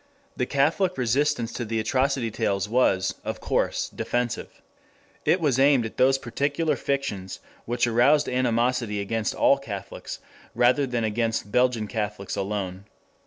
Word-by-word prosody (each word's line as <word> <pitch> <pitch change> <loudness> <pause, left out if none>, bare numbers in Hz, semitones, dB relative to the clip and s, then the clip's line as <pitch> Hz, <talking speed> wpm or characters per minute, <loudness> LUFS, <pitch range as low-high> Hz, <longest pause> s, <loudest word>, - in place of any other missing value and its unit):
The - - -1
Catholic 165 +7 +1
resistance 125 -1 +1
to 120 - -3
the 115 0 -2
atrocity 130 +1 0
tales 100 -3 -1
was, 105 -5 +2
of - - -4
course, - - 0
defensive. 120 -1 -3 0.6
It 185 - +3
was 140 -6 +1
aimed 135 -3 +4
at 110 - -7
those 135 +1 +4
particular 140 +5 -1
fictions 120 -11 -3 0.3
which 120 +1 +1
aroused 125 +6 +4
animosity 120 -3 0
against 110 +2 -2
all 140 - +4
Catholics, 100 -7 -7 0.4
rather 130 +3 +3
than 120 -2 -1
against 110 -1 -1
Belgian 125 -3 +2
Catholics 105 -3 -4
alone. 95 -1 -3
120 Hz, 135 wpm, -25 LUFS, 105-135 Hz, 0.6 s, aimed